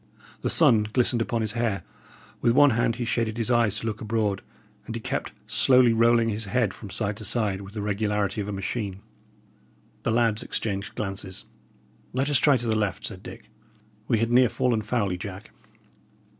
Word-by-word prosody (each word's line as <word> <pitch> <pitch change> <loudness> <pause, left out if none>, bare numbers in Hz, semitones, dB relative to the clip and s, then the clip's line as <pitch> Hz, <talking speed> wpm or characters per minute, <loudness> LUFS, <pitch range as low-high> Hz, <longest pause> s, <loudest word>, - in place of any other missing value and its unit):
The - - 0
sun 105 -2 +5
glistened 120 0 +2
upon 115 0 -1
his 110 -1 0
hair; 110 -5 -1 0.6
with 115 - +3
one 145 +2 +6
hand 115 0 +1
he 120 0 -3
shaded 115 0 -1
his 115 +1 -1
eyes 115 -4 +3
to - - -7
look 110 -1 -3
abroad, 110 -3 -1 0.5
and - - -5
he - - -3
kept - - -3
slowly 125 -3 +4
rolling 115 0 +4
his 110 0 -2
head 110 -2 0
from 105 - -10
side 100 0 -2
to 110 - -9
side, 105 -3 -1
with 100 +2 -11
the 105 - -3
regularity 105 0 -1
of 100 - -5
a - - -3
machine. 100 0 -4 1.0
The - - -1
lads 115 -1 +2
exchanged 100 -2 -3
glances. 95 -2 -5 0.7
"Let 135 +3 0
us 140 - +4
try 145 -3 +4
to 120 - -5
the 110 -1 +1
left," 105 -4 -1
said - - -6
Dick. - - -11 0.6
"We 115 - +2
had 115 +2 0
near 125 0 +5
fallen 120 -3 0
foully, 105 -5 -1
Jack." 100 0 -8
110 Hz, 185 wpm, -26 LUFS, 105-120 Hz, 1.0 s, one